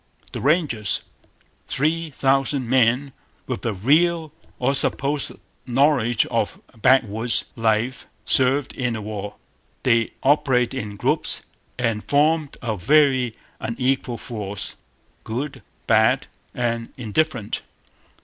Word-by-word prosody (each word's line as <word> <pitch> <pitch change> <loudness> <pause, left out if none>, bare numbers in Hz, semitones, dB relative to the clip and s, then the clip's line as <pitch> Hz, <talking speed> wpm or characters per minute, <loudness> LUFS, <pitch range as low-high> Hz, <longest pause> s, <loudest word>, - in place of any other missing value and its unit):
The - - -5
Rangers. 135 - +1 0.7
Three 160 +3 0
thousand 135 -1 +1
men 130 +2 +2 0.3
with - - -4
a - - +1
real 160 - +2 0.3
or 130 +2 +1
supposed 140 +1 +2 0.3
knowledge 125 -3 +2
of - - -2 0.2
backwoods 115 -1 +2
life 115 +3 0 0.2
served 135 +1 +4
in 125 -2 -2
the 110 - -4
war. 105 -1 -6 0.5
They 115 -3 +2
operated 130 -3 +3
in 105 -1 -7
groups - - 0 0.3
and 115 -4 -1
formed 150 +1 +1
a 115 -3 -1
very 130 - +3 0.2
unequal 125 +1 -1
force 105 -4 -5 0.5
good, 135 +6 -4 0.2
bad, 115 +4 +3 0.3
and 115 -2 -2
indifferent. 125 -1 -1
125 Hz, 105 wpm, -22 LUFS, 115-140 Hz, 0.7 s, served